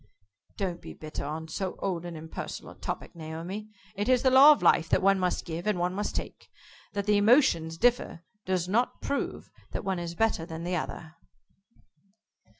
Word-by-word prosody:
"Don't 180 Hz, -3 st, -2 dB
be -, -, -9 dB
bitter 155 Hz, -2 st, -6 dB
on 160 Hz, +2 st, -4 dB
so 185 Hz, +4 st, -3 dB
old 175 Hz, -3 st, -2 dB
and 170 Hz, -2 st, -6 dB
impersonal 160 Hz, +1 st, -7 dB
a -, -, -13 dB
topic, -, -, -5 dB
Naomi. 170 Hz, +6 st, -6 dB, 0.2 s
It 205 Hz, +3 st, -2 dB
is 255 Hz, -1 st, +4 dB
the 260 Hz, -, +4 dB
law 270 Hz, +3 st, +10 dB
of 295 Hz, -, +2 dB
life 160 Hz, -, +4 dB
that -, -, +2 dB
one 195 Hz, 0 st, +4 dB
must 180 Hz, -1 st, -1 dB
give, 170 Hz, +3 st, -5 dB
and 210 Hz, -3 st, +2 dB
one 175 Hz, +1 st, 0 dB
must 205 Hz, +2 st, -3 dB
take. -, -, -6 dB, 0.4 s
That 200 Hz, -1 st, -2 dB
the 210 Hz, 0 st, +4 dB
emotions 205 Hz, -, +4 dB
differ 240 Hz, -6 st, +1 dB, 0.2 s
does 185 Hz, -2 st, -1 dB
not 230 Hz, +6 st, +1 dB
prove 280 Hz, -, -3 dB, 0.2 s
that -, -, -4 dB
one 190 Hz, -2 st, -1 dB
is 170 Hz, 0 st, -5 dB
better 225 Hz, -4 st, +1 dB
than 165 Hz, 0 st, -7 dB
the 180 Hz, +1 st, -1 dB
other." 160 Hz, -1 st, -5 dB
185 Hz, 185 wpm, -28 LUFS, 165-210 Hz, 0.4 s, law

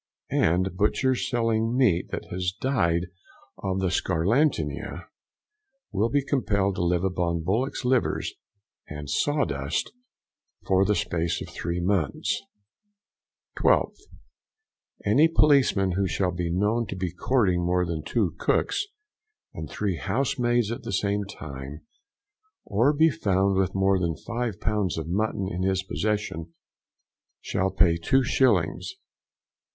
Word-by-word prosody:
And 90 Hz, +3 st, +2 dB
butchers 125 Hz, +6 st, +1 dB
selling 115 Hz, 0 st, +1 dB
meat 105 Hz, -10 st, +3 dB
that -, -, -5 dB
has 90 Hz, 0 st, -1 dB
died 90 Hz, -10 st, +1 dB, 0.5 s
of 95 Hz, -1 st, -2 dB
the 95 Hz, -2 st, 0 dB
scarlatina, 100 Hz, -, 0 dB, 0.9 s
will 105 Hz, +2 st, +1 dB
be 140 Hz, 0 st, +1 dB
compelled 100 Hz, -8 st, +1 dB
to -, -, 0 dB
live 85 Hz, 0 st, +1 dB
upon 85 Hz, -3 st, -1 dB
bullocks' 120 Hz, -, -1 dB
liver 125 Hz, 0 st, +2 dB, 0.7 s
and 75 Hz, -1 st, -7 dB
sawdust 75 Hz, -, 0 dB, 0.7 s
for 95 Hz, +1 st, +3 dB
the 105 Hz, -, +2 dB
space 85 Hz, -3 st, -1 dB
of -, -, -7 dB
three 85 Hz, +1 st, -3 dB
months. 90 Hz, -4 st, 0 dB, 1.2 s
12th. -, -, +2 dB, 1.1 s
Any 155 Hz, +3 st, +5 dB
policeman 140 Hz, -, +3 dB
who 95 Hz, +2 st, 0 dB
shall 90 Hz, +1 st, 0 dB
be 90 Hz, -1 st, -3 dB
known 105 Hz, +6 st, +1 dB
to -, -, -5 dB
be 90 Hz, -2 st, -3 dB
courting 90 Hz, -5 st, +1 dB
more 90 Hz, +1 st, +1 dB
than 85 Hz, -3 st, -3 dB
two 100 Hz, -3 st, 0 dB
cooks 400 Hz, -, +1 dB, 0.7 s
and 80 Hz, -2 st, -6 dB
three 100 Hz, -5 st, -2 dB
housemaids 120 Hz, -3 st, 0 dB
at 120 Hz, -, -4 dB
the 120 Hz, -3 st, -5 dB
same 100 Hz, +1 st, 0 dB
time, 70 Hz, -5 st, -8 dB, 0.8 s
or 115 Hz, +7 st, +3 dB
be 160 Hz, +2 st, +4 dB
found 95 Hz, -4 st, +1 dB
with 95 Hz, 0 st, 0 dB
more 95 Hz, 0 st, +3 dB
than 85 Hz, -3 st, -1 dB
five 120 Hz, -4 st, -4 dB
pounds 105 Hz, -5 st, 0 dB
of 80 Hz, -1 st, -4 dB
mutton 100 Hz, +1 st, -1 dB
in 90 Hz, -1 st, -3 dB
his 95 Hz, 0 st, +1 dB
possession, 95 Hz, -5 st, -3 dB, 0.8 s
shall 95 Hz, +1 st, -1 dB
pay 85 Hz, -3 st, +2 dB
2s. 125 Hz, -, +2 dB
95 Hz, 125 wpm, -26 LUFS, 85-115 Hz, 1.2 s, Any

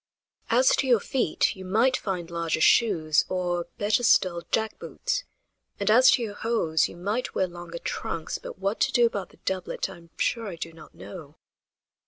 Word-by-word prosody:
"As 250 Hz, +3 st, +4 dB
to 275 Hz, -, 0 dB
your 240 Hz, -3 st, +5 dB
feet, 245 Hz, -6 st, 0 dB
you 190 Hz, -, -9 dB
might 225 Hz, +8 st, +2 dB
find 180 Hz, -6 st, -4 dB
larger 170 Hz, -2 st, -1 dB
shoes, 160 Hz, -7 st, +4 dB
or, 175 Hz, -2 st, -1 dB
better 205 Hz, +3 st, +1 dB
still, 185 Hz, -7 st, +3 dB
jack 220 Hz, -1 st, -1 dB
boots; -, -, -3 dB, 0.5 s
and, 200 Hz, +1 st, +2 dB
as 255 Hz, +3 st, +7 dB
to 245 Hz, -, +1 dB
your 210 Hz, -3 st, -4 dB
hose, 205 Hz, -9 st, +1 dB
you -, -, -12 dB
might 205 Hz, +8 st, -3 dB
wear 190 Hz, -, +2 dB
longer 175 Hz, -1 st, -8 dB
trunks, 165 Hz, -1 st, -4 dB
but -, -, -9 dB
what 195 Hz, +3 st, -2 dB
to -, -, +2 dB
do 240 Hz, -2 st, +4 dB
about 205 Hz, -5 st, -2 dB
the -, -, -21 dB
doublet 190 Hz, 0 st, -2 dB
I 190 Hz, -, -11 dB
am 170 Hz, -1 st, -18 dB
sure 230 Hz, -2 st, 0 dB
I 185 Hz, -, -5 dB
do 165 Hz, 0 st, -7 dB
not 160 Hz, -1 st, -15 dB
know." 155 Hz, -6 st, -10 dB
190 Hz, 190 wpm, -26 LUFS, 170-225 Hz, 0.5 s, as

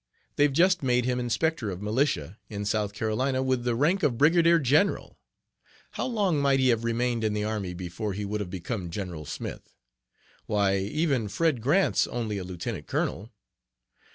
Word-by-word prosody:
They've 145 Hz, 0 st, +3 dB
just 180 Hz, +5 st, +3 dB
made 125 Hz, -2 st, +2 dB
him 125 Hz, 0 st, 0 dB
inspector 125 Hz, +1 st, 0 dB
of 90 Hz, -2 st, -5 dB
militia 105 Hz, -, -1 dB
in 105 Hz, -1 st, -4 dB
South 105 Hz, -1 st, 0 dB
Carolina, 130 Hz, +5 st, -1 dB
with 130 Hz, -2 st, 0 dB
the 120 Hz, -1 st, 0 dB
rank 165 Hz, -, +2 dB
of 130 Hz, -8 st, +1 dB
brigadier 170 Hz, +4 st, +5 dB
general. 150 Hz, +7 st, +1 dB, 0.7 s
How -, -, -3 dB
long 200 Hz, -, +1 dB
might 140 Hz, -1 st, +3 dB
he 130 Hz, -1 st, +3 dB
have 115 Hz, -1 st, +2 dB
remained 115 Hz, 0 st, 0 dB
in 110 Hz, -1 st, +1 dB
the 105 Hz, 0 st, -1 dB
army 105 Hz, -4 st, -3 dB
before 90 Hz, +3 st, -4 dB
he 100 Hz, +2 st, -4 dB
would 105 Hz, +1 st, -3 dB
have 95 Hz, -, -5 dB
become 90 Hz, +1 st, -4 dB
'General 85 Hz, -4 st, -5 dB
Smith?' -, -, -7 dB, 0.7 s
Why, 100 Hz, -2 st, +2 dB
even 130 Hz, -, 0 dB
Fred 140 Hz, +4 st, 0 dB
Grant's 145 Hz, -, +2 dB
only 110 Hz, -4 st, -3 dB
a -, -, -5 dB
lieutenant 90 Hz, -1 st, -5 dB
colonel. 105 Hz, +5 st, -2 dB
115 Hz, 170 wpm, -27 LUFS, 105-140 Hz, 0.7 s, brigadier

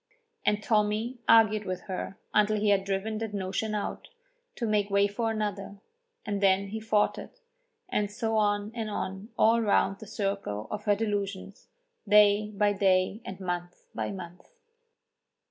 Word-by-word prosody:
And 210 Hz, 0 st, +2 dB
Tommy 215 Hz, +3 st, 0 dB
argued 215 Hz, -2 st, +6 dB
with 185 Hz, -1 st, -3 dB
her 190 Hz, 0 st, -5 dB, 0.2 s
until 210 Hz, 0 st, +3 dB
he 210 Hz, 0 st, +2 dB
had 195 Hz, -1 st, +3 dB
driven 200 Hz, +2 st, -2 dB
that 220 Hz, -2 st, -4 dB
notion 200 Hz, +3 st, -2 dB
out, 205 Hz, -, -4 dB, 0.5 s
to 235 Hz, -, -3 dB
make 210 Hz, -2 st, +1 dB
way 200 Hz, 0 st, +3 dB
for 225 Hz, +3 st, -2 dB
another, 205 Hz, -2 st, -3 dB, 0.5 s
and 205 Hz, -1 st, -2 dB
then 195 Hz, 0 st, +3 dB
he 220 Hz, +2 st, -4 dB
fought 215 Hz, -1 st, +1 dB
it, -, -, -11 dB, 0.5 s
and 210 Hz, -, 0 dB
so 225 Hz, +1 st, -2 dB
on 205 Hz, 0 st, +1 dB
and 225 Hz, -2 st, -4 dB
on 195 Hz, +1 st, -4 dB
all 230 Hz, +1 st, +4 dB
round 200 Hz, -2 st, +2 dB
the 220 Hz, -, -10 dB
circle 195 Hz, -, -3 dB
of 210 Hz, 0 st, -5 dB
her 205 Hz, -1 st, +4 dB
delusions, 200 Hz, -2 st, -3 dB, 0.4 s
day 210 Hz, 0 st, +5 dB
by 205 Hz, 0 st, +1 dB
day 190 Hz, +1 st, +2 dB
and 190 Hz, 0 st, -7 dB
month 175 Hz, -1 st, -5 dB
by -, -, -3 dB
month. 180 Hz, -2 st, -9 dB
205 Hz, 160 wpm, -28 LUFS, 195-215 Hz, 0.5 s, argued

